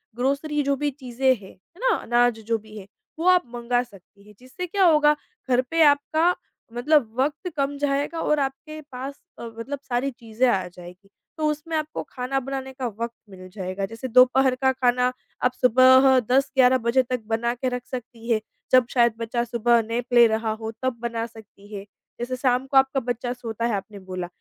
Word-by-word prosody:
Grocery 280 +4 0
जो 280 0 +1
भी 290 +2 -1
चीज़ें 260 -1 -2
हैं, 200 -4 -13
है 265 - -25
ना? 455 - +3
अनाज 240 -1 +1
जो 230 0 +1
भी 215 0 -13
है 195 -1 -10 0.3
वो 340 - 0
आप 365 -1 +5
मँगा 240 +1 0
सकती 200 -3 -19
हैं, 210 - -15
जिससे 255 +9 -7
क्या 390 +2 +1
होगा 300 -3 +5 0.3
घर 250 0 +4
पे 330 0 +2
आपका 310 +4 +3 0.4
मतलब 255 0 +2
वक़्त 295 +6 -1
कम 280 0 -1
जाएगा 285 +3 -1
और 300 -2 +1
आपके 280 +3 -4
पास 265 +2 -6 0.3
अ, - - -7
मतलब 230 +5 -6
सारी 255 +3 0
चीज़ें 235 +1 -1
आ 185 -5 0
जाएगी, 180 +2 -14 0.3
तो 310 - 0
उसमें 305 +2 -4
आपको 310 0 -4
खाना 260 +1 -2
बनाने 265 0 -5
का 255 -2 -3
वक़्त 230 +2 -5 0.2
मिल 185 -1 -11
जाएगा। 190 0 -3
जैसे 225 +5 -7
दोपहर 255 +1 +5
का 265 - +4
खाना, 250 -1 +1 0.3
आप 250 - +2
सुबह 260 +1 +6
10-11 260 -1 +4
बजे 260 +2 +3
तक 250 -1 -3
बनाके 235 +3 -1
रख 250 0 -5
सकती 235 -2 -7
हैं, 220 - +3 0.3
जब 255 -1 +6
शायद 235 -2 +3
बच्चा 235 +1 -1
सुबह 235 0 +2
नैप 235 +1 -2
ले 240 -1 +8
रहा 220 0 -1
हो, 220 +1 -5
तब 260 -2 -1
बना 230 -1 -2
सकती 220 -3 -15
हैं। 200 0 -7 0.3
जैसे 245 +2 -3
शाम 255 0 +1
को 270 0 +2
आपका 270 0 +4
बच्चा 245 0 -3
सोता 230 -2 -4
है 235 -3 0
आपने 200 +1 -7
बोला, 185 -1 -6
250 Hz, 190 wpm, -24 LUFS, 230-270 Hz, 0.4 s, ले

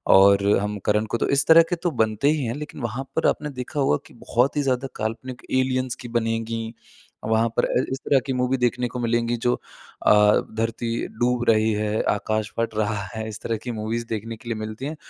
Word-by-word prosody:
और 100 +1 +6
हम 105 +1 -2
करण 105 +1 +2
को 115 - -2
तो - - -1
इस 140 0 +2
तरह 165 +1 +9
के 175 - +1
तो 175 - +1
बनते 110 +6 +1
ही 150 -5 -1
हैं 115 - -2
लेकिन 150 -2 -7
वहाँ 120 +3 -3
पर 160 - +2
आपने 150 0 0
देखा 125 +4 -4
होगा 105 - +3
कि - - -18
बहुत 125 +3 +2
ही - - +3
ज़्यादा 130 0 0
काल्पनिक 115 +3 -4
एलियंस 130 -1 +1
की 120 - -7
बनेगी। 115 0 -2 0.5
वहाँ 110 +1 +2
पर - - +4
अ, 125 - +1
इस 135 - -1
तरह 135 - +4
की 135 - -1
मूवी 125 +1 +1
देखने 125 0 0
को 125 +1 -6
मिलेंगी 120 0 +1
जो 120 +2 +1 0.5
अ, - - +7 0.5
धरती 115 +1 -1 0.3
डूब 120 0 +1
रही 110 0 +4
है, 105 +1 0
आकाश 110 +1 -1
फ़ट 115 -1 -1
रहा 105 -1 0
है 110 0 -4
इस 105 - -7
तरह 115 -1 -2
की 125 - -3
मूवीज़ 115 +1 -3
देखने 115 +1 -4
के 120 0 -10
लिए 115 - -1
मिलती 110 +4 -5
हैं। 155 +2 -4
115 Hz, 220 wpm, -24 LUFS, 110-130 Hz, 0.5 s, तरह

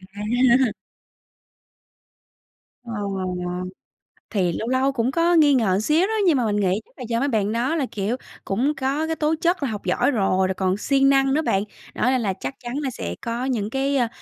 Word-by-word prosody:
À. 240 +2 +2 2.1
Ờ, 230 -1 -7 1.4
thì 185 -5 +1
lâu 225 - -4
lâu 260 +2 +2
cũng 250 -1 0
có 335 +3 +2
nghi 295 -3 +6
ngờ 200 -7 +2
xíu 315 - +2
đó 445 - -2
nhưng 305 -5 +4
mà 240 - +1
mình 210 -1 0
nghĩ 195 0 +1
chắc - - -29
là 255 - -7
do 230 0 +1
mấy 280 - +1
bạn 215 -5 0
đó 245 +7 0
là, 290 -5 0
kiểu, 215 +5 -2 0.3
cũng 255 +10 0
có 275 +4 -1
cái 320 - -1
tố 310 +1 +1
chất 345 -3 +1
là 265 - 0
học 210 -2 -6
giỏi - - +2
rồi, 190 -5 +1
rồi 190 - -1
còn 190 0 0
siêng 275 +3 +3
năng 270 0 +3
nữa 310 - +2
bạn. 195 -9 +1 0.3
Đó, - - -5
nên 260 -2 +2
là 195 -3 0
chắc 135 -7 -6
chắn 240 0 -6
là 290 -3 -2
sẽ 90 - -5
có 235 +2 -3
những 220 -6 -1
cái, 275 +2 0
ơ, 240 -2 +2
250 Hz, 205 wpm, -23 LUFS, 210-275 Hz, 2.1 s, nghi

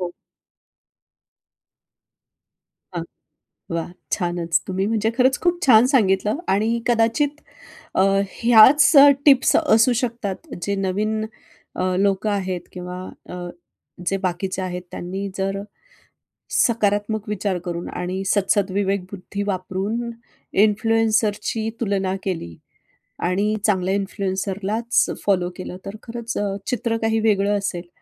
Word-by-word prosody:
हो. 175 -1 -3 2.8
हां, - - -2 0.7
वाह! 170 +1 -3 0.2
छानच 175 -3 0
तुम्ही 190 +1 -1
म्हणजे 220 0 +1
खरंच 260 +1 +3
खूप 350 0 +1
छान 235 -2 +7
सांगितलं 210 -1 +2 0.2
आणि 215 +3 +1 0.2
कदाचित 240 +6 +1 0.6
अ, 190 - +3 0.3
ह्याच 250 +7 +6
अ, 280 +1 +10 0.2
टिप्स 275 -3 +6
असू 225 +3 +4
शकतात 235 - -4
जे 200 +2 -1
नवीन 210 +3 -1 0.5
अ, 185 0 -1
लोकं 200 +2 +1
आहेत 190 -3 -2
किंवा 180 0 -7 0.3
अ, - - -7 0.7
जे 195 - +1
बाकीचे 185 +1 -2
आहेत. 180 -1 -4
त्यांनी 190 +3 -5
जर 195 +1 -1 0.9
सकारात्मक 210 -1 +1
विचार 200 -2 -1
करून 175 -1 -4
आणि 185 +2 -4
सद्सदविवेकबुद्धी 200 -1 -1
वापरून 195 +5 -2 0.5
इन्फ्लुएन्सरची 220 0 +1
तुलना 195 -3 0
केली 165 - -4 0.7
आणि 205 +4 +1
चांगल्या 190 -2 +1
इन्फ्लुएन्सरलाच 200 +3 -1 0.2
फॉलो 185 -3 +2
केलं, 185 -1 -7
तर 195 +2 -6
खरंच 235 0 -5
अ, 200 -1 -1
चित्र 230 -1 -1
काही 225 0 +1
वेगळं 205 -2 +2
असेल. 180 -3 -4
200 Hz, 110 wpm, -22 LUFS, 185-225 Hz, 2.8 s, अ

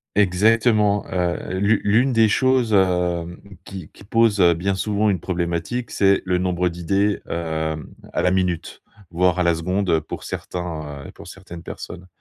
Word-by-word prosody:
Exactement, 105 +1 +3
heu, 90 -1 -2
l'u 100 +2 +3
l'une 115 +6 +3
des 115 -2 +4
choses, 130 0 +2
hem, 90 -3 +1 0.2
qui 95 -5 -9
qui - - -16
pose, 110 -1 +2
heu, 85 -1 +6
bien 95 +4 -1
souvent, 105 +2 0
une 95 -3 0
problématique, 85 +7 -3
c'est 100 -1 +2
le 90 -1 +1
nombre 90 0 0
d'idées, 95 +4 0
hem, 80 -2 -3 0.2
à - - -1
la 90 - +2
minute, 90 -3 -2 0.3
voire 90 +1 +1
à - - +2
la 85 -1 +3
seconde, 90 +4 -1
heu, 80 -2 +3
pour 75 - -8
certains, 75 -5 -6
heu, - - -10
pour - - -13
certaines 85 -1 -11
personnes, 90 +1 -9
90 Hz, 165 wpm, -21 LUFS, 85-105 Hz, 0.3 s, heu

